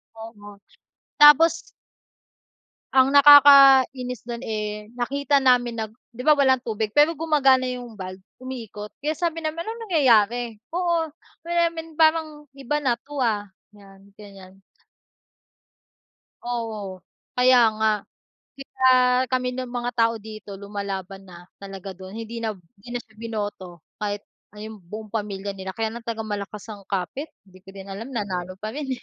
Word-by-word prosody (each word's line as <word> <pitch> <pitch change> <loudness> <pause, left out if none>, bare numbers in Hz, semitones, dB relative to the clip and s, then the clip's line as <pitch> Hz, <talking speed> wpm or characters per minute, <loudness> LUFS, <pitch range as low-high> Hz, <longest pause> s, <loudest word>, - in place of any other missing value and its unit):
Tama, 205 -2 -11 0.6
tapos. 320 +3 +7 1.3
Ang 260 0 +5
nakakainis 270 -4 +7
do'n, 235 +2 -5
eh, 210 -1 -4
nakita 280 +3 0
namin 245 -3 +2
nag 220 -1 -5 0.2
di 240 - -12
ba, 300 +2 +4
walang 265 -2 +3
tubig 220 -2 -3
pero 300 +2 +4
gumagana 275 -5 +3
yung 245 -3 -6
valve, 185 -1 -8 0.2
umiikot 230 -5 -8
kaya 305 +2 -2
sabi 330 -2 -2
namin, 320 +1 -4
"Anong 455 +1 -6
nangyayari, 240 - +2 0.2
oo 340 -3 0 0.9
parang 315 -2 +2
iba 275 +1 -3
na 250 - +3
'to, 290 0 -11
ah," 215 -6 0 0.2
'yan 200 -1 -18
gan'yan. 195 -2 -14 1.8
Oo, 220 -6 -5 0.4
kaya 250 -3 +6
nga. 220 0 +2 0.7
Di 275 - -9 0.2
ba, 260 - +3 0.4
kami 255 -1 -1
ng 255 0 -5
mga 245 0 -3
tao 230 0 +3
dito 215 -2 -9
lumalaban 195 -1 -6
na 175 -1 -13 0.2
talaga 195 -1 -8
dun 190 +2 -11
hindi 230 +1 -6
na 220 -2 -3 0.2
hindi 240 +5 -10
na 245 - -3
siya 220 - -27
binoto 205 -7 -6 0.2
kahit 205 -1 -3 0.3
ayun 215 +1 -9
buong 210 +4 -10
pamilya 205 -2 -4
nila 190 0 -7
kaya 225 -1 -2
ng 235 0 -10
tag 225 -1 -3
malakas 210 0 -6
ang 200 -2 -10
kapit 200 - -3 0.2
hindi 185 -2 -19
ko 195 - -13
din 195 0 -10
alam 200 +4 -7
nanalo 185 -4 -4
pa 215 - -3
rin, 285 +3 -5
eh. - - -14
225 Hz, 145 wpm, -23 LUFS, 205-265 Hz, 1.8 s, tapos